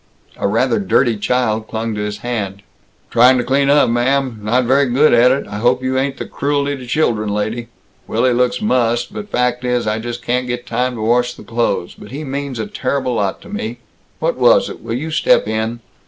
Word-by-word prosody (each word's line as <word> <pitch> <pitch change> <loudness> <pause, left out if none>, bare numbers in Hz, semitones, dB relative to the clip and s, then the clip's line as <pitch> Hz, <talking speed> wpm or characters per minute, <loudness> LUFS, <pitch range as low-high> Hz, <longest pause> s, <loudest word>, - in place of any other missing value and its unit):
A - - 0
rather - - +1
dirty 130 - +2
child 110 0 0
clung 115 0 -3
to 105 - -3
his 105 0 -3
hand. 100 -5 -3 0.5
"Trying 125 +2 +6
to 125 - 0
clean 140 +2 +2
up, 145 -2 +5
ma'am. 125 0 0
Not 120 +5 +1
very 135 +3 +3
good 135 +4 +4
at 120 +1 +6
it. 135 +2 0
I 100 - -6
hope 125 +3 +2
you 130 0 -1
ain't 135 0 -2
the - - -5
Cruelty 145 0 -1
to 130 -2 -10
Children 115 -6 0
lady. 110 +3 -2 0.4
Willy 130 -1 +2
looks 125 - +1
mussed, 120 - +1
but 210 -1 -7
fact 125 -6 0
is, 125 -1 0
I 110 +1 -1
just 120 +1 -6
can't 125 +1 -1
get 120 0 -4
time 125 0 -1
to 110 - -6
wash 120 +2 +1
the - - -12
clothes, 115 -6 -1
but 105 - -13
he 145 +4 -6
means 140 -2 -4
a 110 - -2
terrible 130 -1 -2
lot 100 -4 -1
to - - -13
me. 120 - -4 0.4
What - - -1
was - - +4
it? - - -10
Will 115 - -4
you 155 +6 -4
step 155 - +3
in?" 110 +2 -2
125 Hz, 215 wpm, -18 LUFS, 115-135 Hz, 0.5 s, Trying